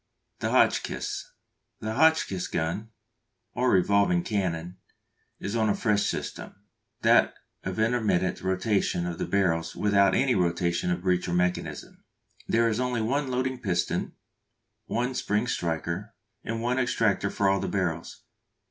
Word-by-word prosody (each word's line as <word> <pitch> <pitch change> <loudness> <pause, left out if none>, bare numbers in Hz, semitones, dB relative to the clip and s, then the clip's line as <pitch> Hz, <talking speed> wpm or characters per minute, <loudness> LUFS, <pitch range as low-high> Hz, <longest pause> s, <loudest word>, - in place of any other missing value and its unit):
The - - -1
Hotchkiss. - - +1 0.5
The 110 0 -3
Hotchkiss 160 - +2
gun, 85 +7 -2 0.6
or 125 +1 +1
revolving 95 -2 +3
cannon, 90 -4 -2 0.6
is 100 +3 -4
on 110 -2 +2
a 100 - +2
fresh 105 -3 +1
system, - - -5 0.5
that - - +5 0.3
of - - -4
intermittent 110 -5 +1
rotation 95 -1 0
of 85 -1 -4
the - - -2
barrels 85 -4 0
without 100 -2 +3
any 130 -1 +3
rotation 85 -1 0
of 90 0 -1
breech 90 -1 +1
or 85 - -1
mechanism. 90 0 -2 0.4
There 115 0 +3
is 110 0 0
only 125 -2 0
one 140 +5 0
loading 130 0 -1
piston, 90 -6 -1 0.7
one 125 +2 -1
spring 105 -2 0
striker, 85 -1 -3 0.3
and 115 0 -3
one 125 +2 +1
extractor 110 -5 +1
for 100 - 0
all 95 0 +3
the - - -3
barrels. 85 -4 -3
100 Hz, 140 wpm, -27 LUFS, 90-115 Hz, 0.7 s, that